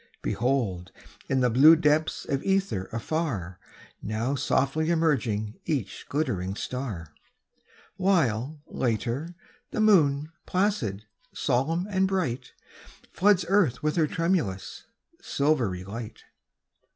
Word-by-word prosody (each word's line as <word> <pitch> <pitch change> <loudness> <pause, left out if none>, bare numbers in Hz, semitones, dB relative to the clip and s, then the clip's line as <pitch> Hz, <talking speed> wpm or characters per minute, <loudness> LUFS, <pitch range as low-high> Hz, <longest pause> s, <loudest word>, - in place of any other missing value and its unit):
Behold, 110 -8 -1 0.4
in 130 -1 +2
the 125 - +3
blue 145 +7 +8
depths 155 0 +1
of 135 -1 -1
ether 195 - 0
afar, 115 - -3 0.4
Now 110 +5 -2
softly 140 +3 +1
emerging 120 -10 0
each 140 - -3
glittering 100 - -1
star; 105 - -5 0.8
While, 150 - +1
later, 125 +8 -2 0.3
the - - -4
moon, 155 -8 +4 0.2
placid, 150 - 0 0.3
solemn 150 +7 0
and 190 -2 +1
bright, 180 -11 -2 0.6
Floods 190 -2 +3
earth 170 - +2
with 150 0 +1
her 160 -3 +3
tremulous, 165 - -2 0.3
silvery 125 -11 0
light. 110 +3 -8
140 Hz, 105 wpm, -27 LUFS, 110-165 Hz, 0.8 s, blue